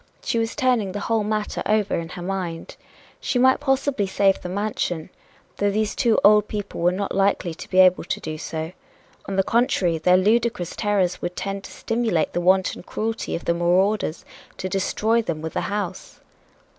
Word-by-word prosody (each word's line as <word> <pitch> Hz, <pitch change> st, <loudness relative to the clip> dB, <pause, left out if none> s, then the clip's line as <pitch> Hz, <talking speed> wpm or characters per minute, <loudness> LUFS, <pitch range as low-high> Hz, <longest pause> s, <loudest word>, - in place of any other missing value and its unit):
She 230 Hz, -, 0 dB
was 225 Hz, 0 st, -2 dB
turning 240 Hz, -7 st, +1 dB
the 205 Hz, -, -3 dB
whole 225 Hz, -1 st, 0 dB
matter 215 Hz, 0 st, -2 dB
over 210 Hz, -2 st, +1 dB
in 165 Hz, -1 st, -4 dB
her 180 Hz, 0 st, -7 dB
mind. 180 Hz, -3 st, -4 dB, 0.4 s
She -, -, -1 dB
might 260 Hz, +1 st, +4 dB
possibly 270 Hz, -6 st, 0 dB
save 195 Hz, 0 st, +2 dB
the 180 Hz, -, -6 dB
mansion, 185 Hz, -4 st, -2 dB, 0.5 s
though 205 Hz, -, +2 dB
these 210 Hz, +1 st, 0 dB
two 235 Hz, -4 st, +2 dB
old 210 Hz, 0 st, +6 dB
people 205 Hz, -4 st, -5 dB
were 175 Hz, +1 st, +4 dB
not 195 Hz, +2 st, -3 dB
likely 195 Hz, -3 st, +1 dB
to -, -, -10 dB
be 185 Hz, -, -1 dB
able 185 Hz, -1 st, +6 dB
to -, -, -2 dB
do 155 Hz, -1 st, -6 dB
so 160 Hz, +1 st, -4 dB, 0.6 s
on 195 Hz, -, -3 dB
the 195 Hz, -, +3 dB
contrary, 190 Hz, -8 st, +1 dB
their 180 Hz, +3 st, +4 dB
ludicrous 215 Hz, -2 st, +1 dB
terrors 200 Hz, -4 st, 0 dB
would 175 Hz, 0 st, -4 dB
tend 195 Hz, 0 st, -4 dB
to -, -, -10 dB
stimulate 225 Hz, -8 st, -1 dB
the 175 Hz, -, 0 dB
wanton 185 Hz, +1 st, +2 dB
cruelty 225 Hz, +4 st, -3 dB
of 170 Hz, -, -6 dB
the 170 Hz, -, +2 dB
marauders 180 Hz, +1 st, +1 dB, 0.3 s
to 185 Hz, -, -3 dB
destroy 210 Hz, +4 st, +1 dB
them 170 Hz, -8 st, -3 dB
with 160 Hz, +1 st, -5 dB
the -, -, -1 dB
house. 200 Hz, -3 st, -4 dB
195 Hz, 185 wpm, -23 LUFS, 180-215 Hz, 0.6 s, old